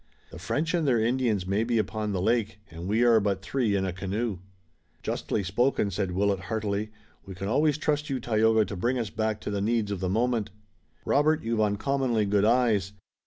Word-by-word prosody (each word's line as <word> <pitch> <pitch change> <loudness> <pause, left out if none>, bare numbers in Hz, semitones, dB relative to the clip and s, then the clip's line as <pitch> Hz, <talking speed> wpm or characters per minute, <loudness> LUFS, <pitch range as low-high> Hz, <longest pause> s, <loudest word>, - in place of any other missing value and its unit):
The 80 - -9
French 150 - -1
and 165 -4 +1
their 120 -4 +3
Indians 115 -4 +1
may 100 +4 +1
be 115 0 0
upon 105 0 -1
the 95 -2 -1
lake, 110 0 +1
and 85 +2 -7
we 110 +4 +2
are 115 -2 +6
but 100 -2 -1
three 115 -3 0
in 95 -1 0
a 95 - -2
canoe." 95 +2 -3 0.6
"Justly 105 - -2
spoken," 105 +2 +1
said 95 -1 -2
Willet 100 +1 +1
heartily. 105 +2 -2 0.3
"We 95 - -9
can 95 +2 -5
always 145 +6 +2
trust 150 -1 -1
you, 135 -2 -1
Tayoga, 110 -1 +3
to 100 - -6
bring 120 +8 0
us 115 -5 -3
back 110 0 -1
to - - -4
the 100 -1 -1
needs 110 -1 0
of 100 - -3
the 95 0 -1
moment. 115 +1 0 0.6
Robert, 155 +2 +2
you've 115 -1 0
uncommonly 115 +2 +1
good 100 0 +2
eyes. 110 -5 +2
110 Hz, 200 wpm, -27 LUFS, 100-120 Hz, 0.6 s, are